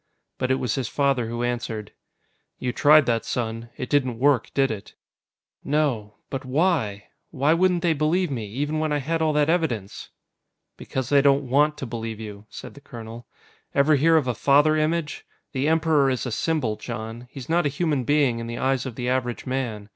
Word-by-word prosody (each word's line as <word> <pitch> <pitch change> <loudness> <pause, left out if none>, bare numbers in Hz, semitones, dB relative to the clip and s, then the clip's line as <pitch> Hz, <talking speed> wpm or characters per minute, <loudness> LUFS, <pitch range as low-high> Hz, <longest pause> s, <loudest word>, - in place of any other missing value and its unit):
But 130 - -1
it 130 - +3
was 125 -4 -1
his 130 -4 -2
father 135 -4 +1
who 120 +1 -3
answered. 115 -3 -3 0.7
"You 125 - -2
tried 150 0 +6
that, 115 -2 +1
son. 115 -1 -3
It 125 - -4
didn't 130 -4 +1
work, 135 -1 +2
did 135 -2 +3
it?" 105 -3 -8 0.7
"No. 130 -9 0 0.2
But 135 -1 -3
why? 130 - 0 0.2
Why 145 +1 +2
wouldn't 180 0 +2
they 170 -2 +3
believe 155 +3 +1
me, 115 -5 -3
even 145 +8 -2
when 155 -1 -1
I 150 - +2
had 160 +4 -2
all 160 -1 +2
that 150 -1 +2
evidence?" 155 - -1 0.7
"Because 130 -2 -4
they 140 -1 +5
don't 140 -1 +3
want 150 +4 +3
to 135 - -5
believe 115 -2 -5
you," 105 -1 -9
said - - -9
the 140 - -14
colonel. 115 -2 -10 0.5
"Ever 140 +2 +4
hear 160 +3 +4
of 150 - +1
a 125 - +1
father 145 +6 +4
image? 155 0 -1 0.3
The 135 +1 -1
Emperor 155 -3 +3
is 130 -1 -1
a 125 - -3
symbol, 125 -4 -1
Jon. 115 +1 -7
He's 130 -2 -9
not 170 -1 +2
a - - 0
human 145 -2 0
being 140 -3 +2
in 115 - -5
the 120 - -5
eyes 130 -1 0
of 125 - -7
the 125 0 -4
average 125 -2 -1
man. 120 -6 -3
135 Hz, 195 wpm, -24 LUFS, 120-150 Hz, 0.7 s, tried